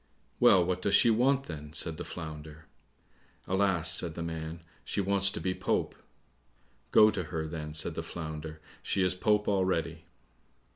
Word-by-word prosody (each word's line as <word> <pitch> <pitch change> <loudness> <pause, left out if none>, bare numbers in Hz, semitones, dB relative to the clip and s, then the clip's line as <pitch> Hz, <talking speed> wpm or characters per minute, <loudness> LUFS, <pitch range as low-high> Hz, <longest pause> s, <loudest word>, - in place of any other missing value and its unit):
"Well, 90 -2 +6
what 90 0 -2
does 100 +1 +2
she 115 - +5
want, 130 +4 +2
then?" 75 - -9
said 80 -1 +1
the - - -5
Flounder. 80 -1 -9 0.8
"Alas," 95 -4 +2
said 80 -1 +1
the 85 - -4
man, 80 0 -6 0.2
"she - - -3
wants 100 0 +3
to 100 - -5
be 95 - -1
Pope." - - -1 1.0
"Go 105 0 +6
to 95 -4 -4
her 80 0 -4
then," 75 -1 -6
said - - -1
the - - -4
Flounder; 80 -1 -7 0.2
"she 95 - 0
is 90 0 +1
Pope 105 +3 +1
already." 90 -5 -1
85 Hz, 160 wpm, -29 LUFS, 80-95 Hz, 1.0 s, Well